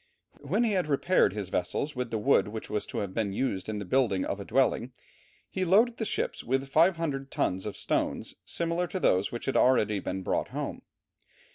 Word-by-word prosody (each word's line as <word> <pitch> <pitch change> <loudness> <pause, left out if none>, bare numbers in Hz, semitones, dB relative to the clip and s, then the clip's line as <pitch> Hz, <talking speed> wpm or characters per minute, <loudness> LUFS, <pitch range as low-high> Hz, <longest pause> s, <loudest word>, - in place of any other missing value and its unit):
When 240 - 0
he 230 - +2
had 185 -5 +1
repaired 155 +6 +3
his 100 -3 -4
vessels 140 +11 -2
with 125 -1 -3
the 115 - -1
wood 105 -4 +3
which 110 +1 -7
was 105 -1 -1
to - - -6
have 95 - -10
been 105 -3 -1
used 100 -4 -2
in 110 - -2
the 100 - -4
building 110 -3 +1
of 100 - -3
a 100 - -6
dwelling, 130 -2 +1 0.5
he 190 - -2
loaded 220 +7 +4
the 220 - -2
ships - - -2
with 135 +2 0
500 160 -3 +2
tons 95 -4 -1
of 105 - -6
stones - - -1
similar 170 +1 -1
to 185 - -4
those 95 - +2
which 120 - -5
he - - 0
had - - +1
already 110 -5 +3
brought 95 0 -2
home. - - -5
130 Hz, 205 wpm, -29 LUFS, 105-165 Hz, 0.5 s, loaded